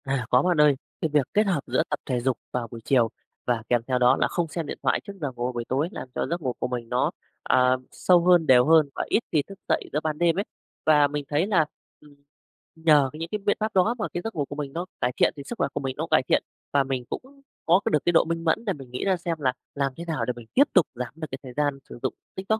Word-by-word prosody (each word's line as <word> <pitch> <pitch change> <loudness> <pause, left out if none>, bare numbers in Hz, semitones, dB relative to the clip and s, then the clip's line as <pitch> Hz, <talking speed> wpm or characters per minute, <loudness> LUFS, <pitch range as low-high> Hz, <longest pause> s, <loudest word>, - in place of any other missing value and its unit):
À, 135 -3 -1
có 125 - +5
bạn 180 +1 +1
ơi. 150 -2 +5 0.3
Cái 160 - 0
việc 145 -3 +3
kết 210 0 +3
hợp 175 -8 0
giữa 130 +5 +1
tập 150 - -2
thể 125 -2 -1
dục 125 -1 0
vào 125 -2 -2
buổi 115 - -8
chiều 120 -4 +3 0.4
và 120 -2 0
kèm 120 -1 +3
theo 130 -1 +1
đó 125 0 +5
là - - +3
không 175 -2 -1
xem 165 +1 -4
điện - - -5
thoại - - +2
trước 200 - -8
giờ 145 -3 -2
ngủ 120 +1 -2
buổi 120 -1 -4
tối 140 +8 0
làm 135 - -7
cho - - -1
giấc 170 +1 -2
ngủ 130 -4 -1
của - - -1
mình 120 -2 -5
nó, - - +1 0.3
ờ, 130 0 +3
sâu 175 -2 +3
hơn, 175 -3 +5
đều 125 -1 +6
hơn 160 -2 +5
và - - -2
ít - - +4
khi 155 - +3
thức 195 -1 -11
dậy - - 0
giữa 150 - +2
ban 155 -1 -1
đêm 170 0 +2
ấy. - - +1 0.4
Và 150 -2 +5
mình 145 0 -3
thấy 155 +6 +1
là, 175 -7 +3 0.3
ừm, 150 -1 -19 0.6
nhờ 155 -4 +4
cái 155 - -9
những 165 0 -4
cái 210 - -2
biện 205 0 +1
pháp 215 0 -2
đó 200 +5 +3
mà 215 - -1
cái 175 - -2
giấc 225 - -5
ngủ 145 -3 -1
của 145 - -8
mình 145 -2 -5
nó 175 +2 -3 0.2
cải 125 - +2
thiện, - - +3
thì 140 - -7
sức 240 - -5
khỏe - - +1
của - - -2
mình 135 -2 -3
nó - - -2
cải - - +5
thiện - - +3 0.3
và 140 -1 +4
mình 130 -2 -3
cũng 275 +2 -8 0.2
có 175 +3 +5
cái - - +2
được 150 - +5
cái 175 - +3
độ 165 - +6
minh 165 0 -3
mẫn 165 +8 +1
để 200 - 0
mình 135 -5 -12
nghĩ 125 - -4
ra 190 -2 +2
xem 170 -1 -3
là 130 -3 +1 0.2
làm 140 -2 0
thế 170 - -6
nào 155 -9 -2
để 125 - -1
mình 120 -2 -11
tiếp 275 - +7
tục 180 -5 +5
giảm 125 0 -5
được 160 -1 -6
cái 130 - -4
thời 130 -2 -9
gian 145 -2 0
sử - - -10
dụng 130 - 0 0.2
TikTok 195 +3 -1
150 Hz, 290 wpm, -25 LUFS, 130-175 Hz, 0.6 s, tiếp